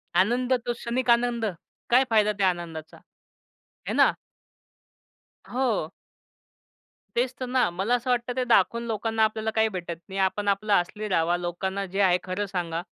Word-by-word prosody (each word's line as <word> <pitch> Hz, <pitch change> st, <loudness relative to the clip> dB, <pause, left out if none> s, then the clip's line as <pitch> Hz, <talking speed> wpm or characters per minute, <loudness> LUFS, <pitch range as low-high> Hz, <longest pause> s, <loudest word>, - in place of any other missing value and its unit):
आनंद, 240 Hz, +8 st, +2 dB
तो 240 Hz, -, 0 dB
क्षणिक 240 Hz, +2 st, -3 dB
आनंद. 235 Hz, -1 st, +3 dB, 0.4 s
काय 250 Hz, +2 st, +6 dB
फायदा 215 Hz, -2 st, +4 dB
त्या 190 Hz, -1 st, +4 dB
आनंदाचा? 165 Hz, -3 st, -6 dB, 0.9 s
हे -, -, -1 dB
ना. -, -, +5 dB, 1.4 s
हो. 240 Hz, -10 st, 0 dB, 1.3 s
तेच 245 Hz, +2 st, +1 dB
तर 255 Hz, -, -2 dB
ना. 250 Hz, -4 st, +2 dB
मला 195 Hz, +8 st, 0 dB
असं 245 Hz, +1 st, -3 dB
वाटतं 245 Hz, 0 st, 0 dB
ते 255 Hz, -, +2 dB
दाखवून 235 Hz, 0 st, +3 dB
लोकांना 225 Hz, 0 st, 0 dB
आपल्याला 220 Hz, 0 st, 0 dB
काही 220 Hz, 0 st, +4 dB
भेटत 175 Hz, -4 st, -5 dB
नाही. 195 Hz, +1 st, -4 dB
आपण 195 Hz, +2 st, 0 dB
आपलं 200 Hz, +1 st, +1 dB
असली 205 Hz, +4 st, 0 dB
राहावा. 175 Hz, -2 st, +1 dB
लोकांना 190 Hz, +3 st, -3 dB
जे 195 Hz, +2 st, -2 dB
आहे 180 Hz, -2 st, +4 dB
खरं 185 Hz, +3 st, -2 dB
सांगा. 175 Hz, -4 st, -3 dB
210 Hz, 155 wpm, -26 LUFS, 185-235 Hz, 1.4 s, काय